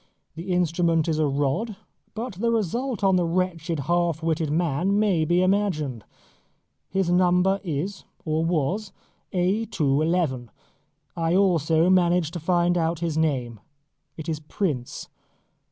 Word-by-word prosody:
The 170 +4 -6
instrument 170 -2 +1
is 155 -1 0
a 155 - +2
rod; 145 - -1 0.4
but 230 +1 -4
the 220 +6 -1
result 230 +2 -1
on 190 -1 +4
the 180 - +2
wretched 170 -3 -1
half 170 +1 0
witted 160 -1 0
man 170 +4 +1
may 195 -7 +2
be 175 +3 +2
imagined. 175 - 0 0.8
His 190 -2 0
number 180 +2 +3
is, 180 +4 -3 0.2
or 155 0 0
was, 175 +5 -1 0.4
A. 190 +5 +1
2. 150 -10 0
11. 155 -8 0 0.7
I 165 +1 0
also 170 -4 +3
managed 175 -3 +2
to 175 - -4
find 175 +1 +2
out 165 0 -1
his 165 -3 -1
name. 130 -8 -1 0.6
It 160 0 -7
is 160 -2 -2
Prince. 150 -5 -3
170 Hz, 135 wpm, -24 LUFS, 155-185 Hz, 0.8 s, on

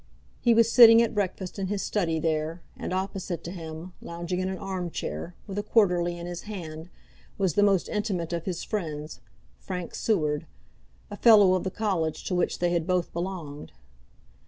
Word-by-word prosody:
He 235 -2 +4
was 230 0 +4
sitting 230 -2 +9
at 235 - -1
breakfast 195 -2 -3
in 190 - -1
his 200 0 -2
study 170 -6 0
there, 160 +1 -1
and - - -5
opposite 185 -2 -3
to 170 - -6
him, 165 0 -8
lounging 170 +2 -4
in 185 0 -1
an 190 - -4
arm 185 -2 -4
chair, 170 +1 -5
with 200 -1 -4
a - - +1
Quarterly 180 -5 +2
in 170 - -7
his 175 0 -5
hand, 165 -4 -7 0.5
was 190 -5 +1
the 205 - +3
most 200 -3 +3
intimate 195 -6 -2
of 170 -1 -3
his 180 -3 -3
friends, 155 -7 -4 0.4
Frank 180 -2 -5
Seward, 155 -7 0 0.6
a 205 - -6
fellow 205 -5 +7
of 185 - 0
the 190 - -1
college 185 -7 -1
to - - -3
which 180 -1 +1
they 175 0 +1
had 170 -1 0
both 180 -2 0
belonged. 170 - -5
180 Hz, 180 wpm, -27 LUFS, 170-200 Hz, 0.6 s, sitting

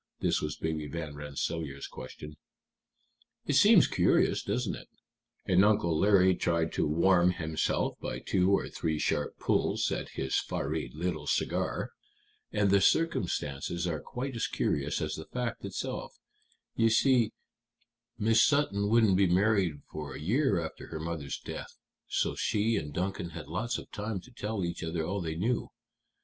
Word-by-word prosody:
This - - +1
was 75 0 -3
Baby 80 -1 -3
Van 80 0 -5
Rensselaer's 75 0 -4
question. 75 +4 -9 1.1
"It - - 0
seems - - +7
curious, - - +2
doesn't - - -1
it?" - - -9 0.6
and 95 +1 +4
Uncle 100 -6 +3
Larry 95 +1 +5
tried 85 -2 0
to - - +1
warm 85 +3 +4
himself 80 -2 -1
by - - -3
two 95 -1 +1
or 100 - +2
three 80 -2 -2
sharp 75 -1 -1
pulls - - +1
at - - -3
his 65 0 0
fiery 75 +3 -3
little 80 -2 -3
cigar. - - -1 0.6
"And 100 -2 +2
the 100 0 +5
circumstances 85 - 0
are 80 -3 -1
quite 130 +1 -5
as 115 - 0
curious 75 +3 -1
as 75 0 -2
the 80 0 -6
fact 125 -2 -3
itself. 100 - -5 0.6
You 115 0 +3
see, 120 0 +3 0.8
Miss 115 +1 +4
Sutton 105 -9 +2
wouldn't 110 -4 +4
be 100 -1 +4
married 95 -4 +2
for 75 -3 -6
a - - -7
year 120 - +2
after 80 -1 -6
her 80 - -6
mother's 80 -4 -4
death, - - -8 0.3
so - - 0
she 110 +2 +1
and 75 -7 -3
Duncan 90 +2 -2
had 75 - -7
lots 115 +9 -2
of - - -10
time 105 -2 -3
to 130 - -16
tell 105 -5 -3
each 85 -1 -4
other 80 0 -2
all 95 +3 -2
they 80 -2 -3
knew. 115 +8 -1
90 Hz, 160 wpm, -30 LUFS, 80-105 Hz, 1.1 s, seems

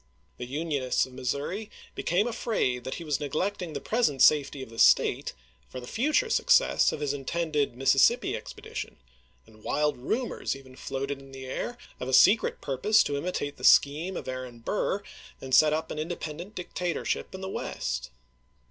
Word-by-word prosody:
The 125 - -5
Unionists 140 -2 0
of 130 - -14
Missouri 140 - -3 0.2
became 180 +5 +1
afraid 215 - -1
that 130 - -3
he 170 - -7
was 150 -4 -1
neglecting 175 +4 -2
the - - -3
present 215 - +1
safety 145 -2 +4
of 115 - -12
the 115 - -9
State - - +4 0.4
for - - -7
the 125 - -9
future 295 - +1
success - - +4
of 150 - -5
his 145 -1 0
intended 145 -1 -1
Mississippi 135 0 +4
expedi - - -8
tion, - - -5 0.5
and 110 -1 -19
wild 150 0 0
rumors 225 - -2
even 130 -1 -13
floated 135 +1 -4
in 135 0 -14
the 135 0 -8
air 240 - -4 0.2
of 125 - -4
a - - -2
dK - - +8
secret 205 - +5
purpose 175 +12 +3
to 145 - -2
imitate 145 -2 -3
the - - -13
scheme 160 +6 +4
of - - -7
Aaron 130 -2 -6
Burr 200 - -1
SlVs.' - - -25 0.4
and 130 -1 -7
set 150 +4 +7
up 155 +1 -2
an 150 - -4
independent 170 +4 -5
dictatorship 180 0 -3
in 190 - -8
the 190 - -4
West. 65 - -4
145 Hz, 180 wpm, -28 LUFS, 130-180 Hz, 0.5 s, dK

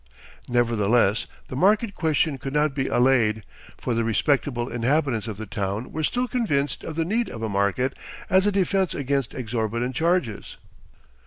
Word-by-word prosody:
Nevertheless, 115 -3 +2 0.2
the - - -7
market 205 - +3
question 155 -4 0
could 135 +1 -5
not 150 -1 +2
be 135 -1 -1
allayed, 120 -4 +3 0.3
for 125 - -2
the 115 0 +1
respectable 120 +1 +1
inhabitants 120 -1 0
of 105 -3 -5
the 110 - -6
town 100 +2 -3
were 155 - -3
still 250 +10 0
convinced 145 - -1
of 160 - -6
the 165 0 0
need 225 +6 0
of 115 - -7
a 110 - -1
market 100 +7 0 0.3
as 190 +2 +3
a - - +3
defense 195 -1 +1
against 140 -2 -1
exorbitant 115 +1 -2
charges. 165 - -1
130 Hz, 160 wpm, -24 LUFS, 115-160 Hz, 0.3 s, market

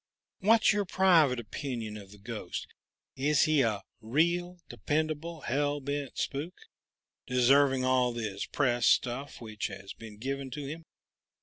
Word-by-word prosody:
What's 220 +2 +5
your 205 0 +1
private 170 -9 +4
opinion 115 -1 -5
of 100 -2 -10
this 105 0 -15
ghost? 105 -4 -5 0.5
Is 140 +1 +3
he 155 -2 +3
a 110 -5 0 0.2
real, 170 +9 +1
dependable, 155 +1 -2
hell 145 +3 0
bent 140 0 -4
spook, 150 +6 -3 0.7
deserving 130 +1 +4
all 130 -1 +3
this 110 -4 -4
press 120 -4 +1
stuff 130 +3 +1
which 110 -2 -4
has 95 0 -9
been 110 -2 -11
given 135 +3 -4
to 145 +2 -6
him? 160 +4 -7
135 Hz, 135 wpm, -30 LUFS, 120-150 Hz, 0.7 s, What's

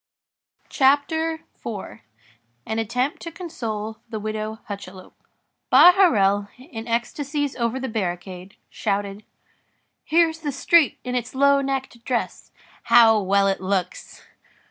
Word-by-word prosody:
CHAPTER 320 +4 +1 0.2
IV—AN 115 - -9
ATTEMPT 250 +6 -2
TO 335 - -7
CONSOLE 225 - -5
THE 220 -2 -4
WIDOW 215 +1 -5
HUCHELOUP 190 -2 -9 0.6
Bahorel, 250 - +5
in 250 -4 -9
ecstasies 280 +5 -2
over 235 +1 -1
the 265 - -4
barricade, 185 -3 -5 0.2
shouted:— 200 +1 -3 0.8
"Here's 325 0 +2
the 300 -3 -3
street 305 +3 +3
in 250 - -4
its 245 0 -3
low 280 +1 +4
necked 270 -3 -4
dress! 250 -2 -3 0.3
How 230 -2 +6
well 200 +1 +2
it 195 -1 0
looks!" 185 -1 -3
230 Hz, 110 wpm, -23 LUFS, 200-280 Hz, 0.8 s, How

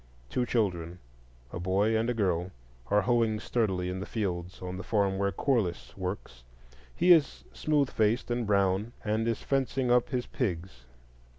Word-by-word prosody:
Two 125 -1 0
children—a 80 - -4
boy 100 +5 +2
and 115 +2 +1
a 120 - 0
girl—are 85 - -1
hoeing 115 -3 +2
sturdily 95 -7 0
in 90 +1 -3
the 95 - -5
fields 90 -5 -3
on 90 0 -5
the 95 - -6
farm 100 -3 +1
where 100 0 +1
Corliss 105 -4 -1
works. 90 -10 -5 0.5
He 180 - +4
is 160 -5 +4
smooth 145 -4 +1
faced 110 +3 +1
and 120 -2 -1
brown, 100 +2 +1
and 110 +2 0
is 115 - -1
fencing 135 -2 0
up 125 -1 +3
his 125 -1 -1
pigs. 95 - -4
100 Hz, 155 wpm, -29 LUFS, 90-120 Hz, 0.5 s, He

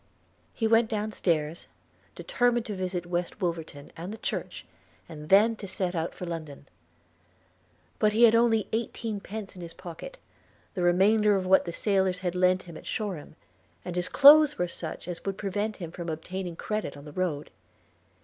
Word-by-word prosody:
He 225 - -1
went 225 0 +4
down 215 -1 -2
stairs, 165 -4 -1 0.5
determined 245 -1 +1
to 210 - -4
visit 185 -2 -3
West 175 +3 -3
Wolverton 165 -5 -4
and 175 +4 -6
the 220 - -7
church, - - -4 0.4
and 150 -2 -10
then 215 +4 +6
to 200 - -7
set 185 -1 -2
out 165 -1 -3
for 180 - -6
London; 155 -5 -7 1.3
but 215 -1 +4
he 225 +3 +3
had 230 -1 +8
only 230 -2 +3
eighteenpence 220 -3 -4
in 180 - -10
his 170 -1 -9
pocket, 185 - -9 0.6
the 185 - -3
remainder 205 +4 +4
of 190 -1 -1
what 190 +1 +4
the 170 - -4
sailors 190 -1 +1
had 180 -2 -1
lent 185 0 +2
him 170 -2 -10
at - - -12
Shoreham, 190 -9 -4 0.5
and 180 - -5
his 180 0 -1
clothes 295 +1 +8
were 180 - 0
such 165 -1 -7
as 175 -2 -6
would 195 -1 -3
prevent 205 +2 -2
him 170 -4 -7
from 170 -1 -6
obtaining 175 +2 -5
credit 210 -7 -4
on 140 - -12
the 150 - -9
road. 165 -5 -2
185 Hz, 175 wpm, -28 LUFS, 170-215 Hz, 1.3 s, had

